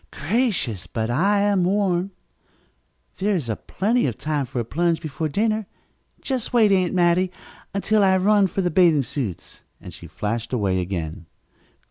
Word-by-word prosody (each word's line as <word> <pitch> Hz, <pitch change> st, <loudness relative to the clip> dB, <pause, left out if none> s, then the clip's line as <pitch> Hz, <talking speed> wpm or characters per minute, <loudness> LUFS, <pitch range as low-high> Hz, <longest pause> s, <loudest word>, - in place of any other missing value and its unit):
"Gracious, 160 Hz, -, -1 dB
but 110 Hz, +4 st, -2 dB
I 200 Hz, +10 st, +2 dB
am 200 Hz, -2 st, +2 dB
warm! 190 Hz, -1 st, +1 dB, 1.1 s
There 200 Hz, +1 st, +1 dB
is 135 Hz, -10 st, -2 dB, 0.2 s
plenty 225 Hz, +2 st, +1 dB
of 120 Hz, -, -4 dB
time 150 Hz, -3 st, -2 dB
for 125 Hz, 0 st, -4 dB
a 120 Hz, -, -2 dB
plunge 170 Hz, +6 st, 0 dB
before 155 Hz, 0 st, -4 dB
dinner. 215 Hz, +4 st, 0 dB, 0.5 s
Just 260 Hz, -3 st, -3 dB
wait, 220 Hz, -4 st, +5 dB
Aunt 185 Hz, -2 st, +2 dB
Mattie, 180 Hz, +1 st, +3 dB, 0.4 s
until 205 Hz, +1 st, +1 dB
I 190 Hz, -1 st, +4 dB
run 200 Hz, +1 st, +4 dB
for 195 Hz, -, -2 dB
the 175 Hz, -, 0 dB
bathing 165 Hz, -4 st, +4 dB
suits," 115 Hz, -, -5 dB, 0.2 s
and -, -, -11 dB
she -, -, -10 dB
flashed 115 Hz, +4 st, -4 dB
away 95 Hz, -6 st, +1 dB
again. 85 Hz, -3 st, -5 dB
175 Hz, 155 wpm, -23 LUFS, 125-200 Hz, 1.1 s, wait